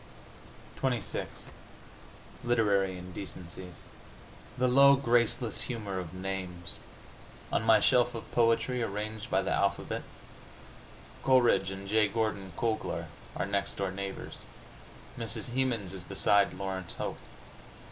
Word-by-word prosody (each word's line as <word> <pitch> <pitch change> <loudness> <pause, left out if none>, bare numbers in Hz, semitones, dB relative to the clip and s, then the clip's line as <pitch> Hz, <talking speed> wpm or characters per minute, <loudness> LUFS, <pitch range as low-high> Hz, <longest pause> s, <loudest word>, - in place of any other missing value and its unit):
XXVI 125 -5 -1 1.2
LITERARY 100 -6 +2
INDECENCIES 90 -1 -8 0.8
The 125 0 +3
low, 140 +2 +7
graceless 120 -3 +2
humor 105 -6 -3
of 85 -3 -6
names! 95 -1 -5 0.7
On - - +3
my 110 0 +6
shelf 120 -1 +3
of 115 - -7
poetry, 115 +1 +2
arranged 105 0 -3
by - - +2
the - - -1
alphabet, - - 0 1.2
Coleridge 120 -7 +4
and 95 0 -7
J. 105 +1 +4
Gordon 100 -3 -2
Cooglar 115 -2 -1 0.3
are - - -1
next 100 0 -1
door 95 -1 -1
neighbors! 95 0 -6 0.8
Mrs. 115 +1 -2
Hemans 120 -8 0
is 95 -2 -5
beside 100 +3 +4
Laurence 95 -2 -4
Hope! - - -4
105 Hz, 110 wpm, -30 LUFS, 95-120 Hz, 1.2 s, low